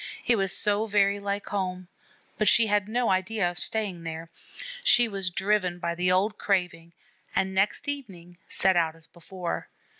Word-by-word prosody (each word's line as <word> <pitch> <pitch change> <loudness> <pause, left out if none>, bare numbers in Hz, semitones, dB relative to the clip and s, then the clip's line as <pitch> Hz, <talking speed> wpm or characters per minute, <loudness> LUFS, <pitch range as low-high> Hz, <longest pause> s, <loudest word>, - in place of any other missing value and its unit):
It 240 - +3
was 195 -3 0
so 210 +2 +3
very 200 -1 +2
like 200 0 -4
home; 185 -2 -3 0.5
but 215 - +1
she 230 - +6
had 210 -1 0
no 240 0 +1
idea 190 0 0
of 175 - -8
staying 205 -6 -2
there. 165 0 -7 0.5
She 245 - +6
was 195 -3 -3
driven 190 -1 0
by 170 -1 -3
the 180 +1 0
old 200 +4 +1
craving, 175 -4 -1 0.4
and 190 0 0
next 195 +9 0
evening 185 -12 -6
set 190 -1 +2
out 165 -2 +1
as 165 -1 -10
before. 175 +1 -6
190 Hz, 170 wpm, -26 LUFS, 175-210 Hz, 0.5 s, she